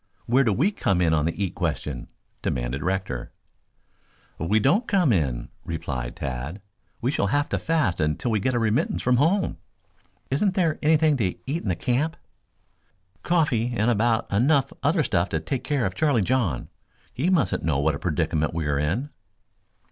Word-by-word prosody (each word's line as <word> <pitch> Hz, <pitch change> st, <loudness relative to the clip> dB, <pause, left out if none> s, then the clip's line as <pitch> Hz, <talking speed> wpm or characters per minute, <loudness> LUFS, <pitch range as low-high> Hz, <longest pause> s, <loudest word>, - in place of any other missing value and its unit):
"Where 130 Hz, +4 st, +4 dB
do 115 Hz, -, +2 dB
we 155 Hz, -, +2 dB
come 95 Hz, -, 0 dB
in 85 Hz, -3 st, +3 dB
on 75 Hz, -1 st, +2 dB
the 85 Hz, +5 st, -1 dB
eat 95 Hz, -, -2 dB
question?" 60 Hz, -5 st, -3 dB, 0.3 s
demanded 60 Hz, +2 st, -2 dB
Rector. 90 Hz, -9 st, -2 dB, 1.1 s
"We 100 Hz, +7 st, +2 dB
don't 190 Hz, -, +2 dB
come 180 Hz, -, +3 dB
in," 65 Hz, -9 st, -1 dB
replied 65 Hz, -7 st, -4 dB
Tad. 70 Hz, +8 st, -4 dB, 0.4 s
"We 125 Hz, +3 st, +1 dB
shall 100 Hz, -, 0 dB
have 145 Hz, +7 st, +1 dB
to -, -, -1 dB
fast 155 Hz, -, 0 dB
until 75 Hz, +10 st, 0 dB
we 110 Hz, -, +2 dB
get 130 Hz, +5 st, 0 dB
a -, -, +2 dB
remittance 115 Hz, -1 st, 0 dB
from 125 Hz, 0 st, +3 dB
home." 175 Hz, +9 st, +2 dB, 0.7 s
"Isn't 185 Hz, +8 st, +1 dB
there 165 Hz, -5 st, +1 dB
anything 155 Hz, -1 st, +4 dB
to 115 Hz, -, +1 dB, 0.2 s
eat 155 Hz, +6 st, -2 dB
in -, -, -7 dB
the 90 Hz, -, +1 dB
camp?" 130 Hz, -, -1 dB, 1.0 s
"Coffee 125 Hz, -9 st, +1 dB
and 110 Hz, +3 st, +3 dB
about 115 Hz, +1 st, +2 dB
enough 135 Hz, +5 st, +3 dB
other -, -, +2 dB
stuff 85 Hz, +3 st, +1 dB
to 80 Hz, -, -1 dB
take 120 Hz, +11 st, -3 dB
care 145 Hz, -6 st, 0 dB
of 95 Hz, -, -1 dB
Charlie 140 Hz, -4 st, +2 dB
John. 105 Hz, -, 0 dB, 0.4 s
He 155 Hz, +9 st, 0 dB
mustn't 155 Hz, -, +2 dB
know 80 Hz, -4 st, 0 dB
what 75 Hz, +2 st, +2 dB
a 70 Hz, -, -5 dB
predicament 80 Hz, -2 st, 0 dB
we 85 Hz, -2 st, -1 dB
are 70 Hz, -1 st, 0 dB
in." 105 Hz, -, -1 dB
110 Hz, 175 wpm, -25 LUFS, -, 1.1 s, Where